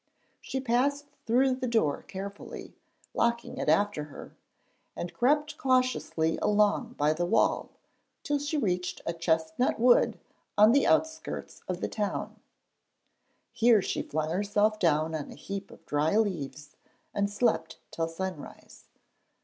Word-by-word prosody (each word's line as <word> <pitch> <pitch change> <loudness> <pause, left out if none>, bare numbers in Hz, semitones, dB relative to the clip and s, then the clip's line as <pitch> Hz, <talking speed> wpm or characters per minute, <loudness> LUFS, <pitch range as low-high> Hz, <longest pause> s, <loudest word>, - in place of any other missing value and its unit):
She 265 - -4
passed 265 +3 +1 0.2
through 255 +3 +4
the 255 0 -3
door 225 -12 +1
carefully, 200 +1 -8 0.4
locking 235 0 0
it - - 0
after 165 -2 +2
her, 145 - -11 0.6
and 175 - -5
crept 295 +5 +1
cautiously 255 -11 +1
along 210 +3 +2
by 150 -7 +2
the 175 +2 -1
wall - - +2 0.5
till 290 0 0
she 290 +2 -2
reached 180 -8 -1
a 170 - -1
chestnut 165 +7 0
wood 245 +1 +4 0.4
on 210 +2 +7
the 280 +2 +4
outskirts 315 0 -1
of 180 -1 -3
the - - 0
town. 205 -2 -3 1.1
Here 230 -1 +5
she - - -2
flung 155 +1 -2
herself 205 +3 +1
down 160 -2 +2
on 155 -3 -4
a - - -10
heap 195 0 -6
of - - -16
dry 150 +7 +1
leaves 155 -8 -2 0.4
and 200 0 0
slept 205 -6 0
till 165 -1 -1
sunrise. 175 -1 -7
205 Hz, 135 wpm, -29 LUFS, 165-245 Hz, 1.1 s, on